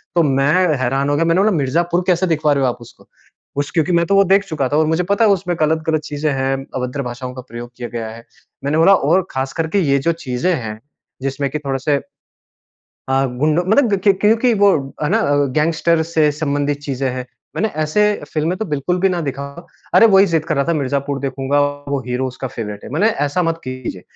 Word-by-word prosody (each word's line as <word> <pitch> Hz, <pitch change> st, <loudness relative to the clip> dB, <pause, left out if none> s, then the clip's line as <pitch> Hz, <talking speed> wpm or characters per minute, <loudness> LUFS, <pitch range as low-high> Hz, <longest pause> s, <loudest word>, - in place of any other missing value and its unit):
तो 170 Hz, -, +4 dB
मैं 135 Hz, -1 st, +2 dB, 0.3 s
हैरान 135 Hz, +2 st, 0 dB
हो 145 Hz, -, +1 dB
गया 165 Hz, +3 st, +1 dB
मैंने 165 Hz, +3 st, +3 dB
बोला, 215 Hz, +2 st, +3 dB
"मिर्ज़ापुर 170 Hz, +6 st, 0 dB
कैसे 185 Hz, 0 st, +2 dB
दिखवा 155 Hz, -3 st, +2 dB
रहे 140 Hz, -1 st, 0 dB
हो 130 Hz, -, +3 dB
आप 120 Hz, -, -4 dB
उसको।" 120 Hz, -, -16 dB, 0.5 s
उस 145 Hz, 0 st, -2 dB
क्योंकि 160 Hz, +1 st, +1 dB
मैं 170 Hz, -1 st, +3 dB
तो 200 Hz, -, +1 dB
वो 195 Hz, -, +6 dB
देख 200 Hz, 0 st, +4 dB
चुका 150 Hz, -6 st, -1 dB
था 145 Hz, -, +1 dB
और 155 Hz, -, +3 dB
मुझे 160 Hz, +3 st, +1 dB
पता 205 Hz, +3 st, +3 dB
है -, -, +4 dB
उसमें 180 Hz, -2 st, 0 dB
ग़लत-ग़लत 155 Hz, 0 st, +1 dB
चीज़ें 150 Hz, 0 st, -2 dB
हैं, 135 Hz, 0 st, 0 dB, 0.2 s
अभद्र 125 Hz, +2 st, -3 dB
भाषाओं 125 Hz, +1 st, -6 dB
का 130 Hz, -, -7 dB
प्रयोग 120 Hz, +1 st, -8 dB
किया 120 Hz, -1 st, -6 dB
गया 115 Hz, -2 st, -5 dB
है। 115 Hz, +1 st, -11 dB, 0.4 s
मैंने 145 Hz, +3 st, 0 dB
बोला, 165 Hz, +5 st, +6 dB
"और 175 Hz, +4 st, +1 dB
ख़ास 130 Hz, 0 st, -3 dB
करके 160 Hz, +5 st, 0 dB
ये 140 Hz, -6 st, +2 dB
जो -, -, +5 dB
चीज़ें 130 Hz, +8 st, 0 dB
हैं 110 Hz, -6 st, -6 dB, 0.4 s
जिसमें 135 Hz, +1 st, -2 dB
कि 150 Hz, -, -2 dB
थोड़े-से" 140 Hz, 0 st, -1 dB, 1.1 s
"अ, 135 Hz, +1 st, +2 dB, 0.2 s
गुंडों 155 Hz, +4 st, +2 dB
मतलब 215 Hz, +1 st, +3 dB
कि 200 Hz, -, +6 dB
क्योंकि 220 Hz, +5 st, +2 dB
वो 200 Hz, -, +7 dB, 0.3 s
है 150 Hz, -, +1 dB
ना 225 Hz, +3 st, +2 dB, 0.4 s
गैंगस्टर 165 Hz, +1 st, +2 dB
से 155 Hz, -2 st, +3 dB
संबंधित 145 Hz, -1 st, 0 dB
चीज़ें 135 Hz, -1 st, -1 dB
हैं। 125 Hz, 0 st, -5 dB, 0.3 s
मैंने 220 Hz, -, +1 dB
ऐसे 155 Hz, +7 st, +1 dB, 0.3 s
फ़िल्में 160 Hz, +4 st, 0 dB
तो 220 Hz, -, -2 dB
बिल्कुल 150 Hz, +6 st, 0 dB
भी 195 Hz, -, +4 dB
ना 180 Hz, -2 st, -1 dB
दिखाओ। 140 Hz, +5 st, -7 dB, 0.3 s
अरे! 230 Hz, -, +8 dB
वही 195 Hz, -1 st, +6 dB
ज़िद 160 Hz, -2 st, +1 dB
कर 155 Hz, -3 st, -2 dB
रहा 140 Hz, -, +2 dB
था 170 Hz, -, 0 dB
मिर्ज़ापुर 140 Hz, 0 st, -1 dB
देखूँगा, 135 Hz, +1 st, -1 dB, 0.3 s
वो 140 Hz, -1 st, -1 dB
हीरो 125 Hz, +1 st, -1 dB
उसका 130 Hz, +1 st, -6 dB
फ़ेवरेट 105 Hz, -4 st, -7 dB
है। -, -, -9 dB
मैंने 180 Hz, +9 st, +3 dB, 0.2 s
ऐसा 145 Hz, +6 st, 0 dB
मत 165 Hz, -1 st, -1 dB
कीजिए। 130 Hz, -8 st, -6 dB
150 Hz, 215 wpm, -18 LUFS, 135-170 Hz, 1.1 s, अरे